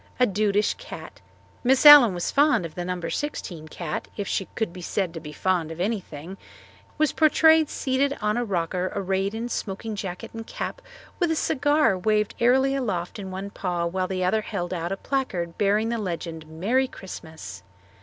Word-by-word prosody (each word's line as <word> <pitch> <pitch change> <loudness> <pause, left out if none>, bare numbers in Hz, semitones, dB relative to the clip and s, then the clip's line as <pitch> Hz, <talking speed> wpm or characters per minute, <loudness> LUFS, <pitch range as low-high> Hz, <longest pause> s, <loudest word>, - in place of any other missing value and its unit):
A 250 - +6
dudish 205 0 +1
cat - - -10 0.4
Miss 260 +3 +3
Allen 285 -10 +10
was 175 - -2
fond 290 - +3
of 160 - -7
the 175 - -4
No. 180 0 -3
16 175 - -4
cat 155 0 -5
if 205 -2 -3
she 195 - -1
could 220 -6 -2
be 180 - -9
said 180 0 -2
to 165 - -5
be 150 -1 -9
fond 175 0 0
of 165 +1 -8
anything 185 -4 -4 0.6
was 305 -1 +2
portrayed 315 0 +5
seated 275 +2 0
on 210 0 0
a 240 - 0
rocker 180 -2 -1
arrayed 195 +2 -1
in 230 +2 -3
smoking 215 -1 -4
jacket 185 -3 -6
and 225 0 -7
cap - - -5 0.4
with 350 -3 +2
a 320 - +1
cigar 290 -6 +2
waved 210 +2 +1
airily 265 +3 +4
aloft 205 -8 -2
in 190 -1 -6
one 190 +2 -6
paw 175 -3 -2
while 185 +2 -1
the 185 -1 -2
other 215 +4 +2
held 185 -5 -4
out 170 0 -3
a 195 - -2
placard 190 -12 -2
bearing 210 +2 +2
the 235 -1 -1
legend 165 -5 -5
"Merry 210 +12 0
Christmas." 160 - -9
195 Hz, 185 wpm, -25 LUFS, 175-245 Hz, 0.6 s, Allen